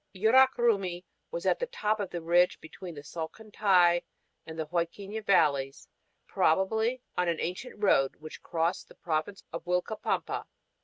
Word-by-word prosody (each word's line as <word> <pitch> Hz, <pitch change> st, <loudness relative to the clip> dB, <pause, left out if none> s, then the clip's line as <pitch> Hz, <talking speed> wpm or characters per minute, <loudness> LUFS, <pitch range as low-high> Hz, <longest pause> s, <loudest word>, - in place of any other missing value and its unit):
Yurak 260 Hz, +7 st, +5 dB
Rumi 195 Hz, -7 st, +1 dB, 0.3 s
is -, -, -4 dB
on -, -, +4 dB, 0.2 s
top 215 Hz, -, 0 dB
of 200 Hz, -3 st, -3 dB
the 175 Hz, -2 st, -5 dB
ridge 175 Hz, +2 st, +3 dB
between 165 Hz, +2 st, -9 dB
the 145 Hz, -, -9 dB
Salcantay 175 Hz, +1 st, +2 dB, 0.5 s
and 160 Hz, 0 st, -8 dB
Huadquiña 175 Hz, +7 st, -3 dB
valleys, 140 Hz, -8 st, +2 dB, 0.4 s
probably 220 Hz, +9 st, +1 dB
on 180 Hz, 0 st, +1 dB
an 170 Hz, -1 st, +1 dB
ancient 180 Hz, +9 st, -4 dB
road 165 Hz, -10 st, +3 dB
which 155 Hz, 0 st, -10 dB
crossed 165 Hz, +1 st, -1 dB
the -, -, -17 dB
province 165 Hz, +4 st, -3 dB
of 165 Hz, -, -5 dB
Uilcapampa. 180 Hz, +4 st, -1 dB
180 Hz, 140 wpm, -29 LUFS, 165-210 Hz, 0.5 s, Yurak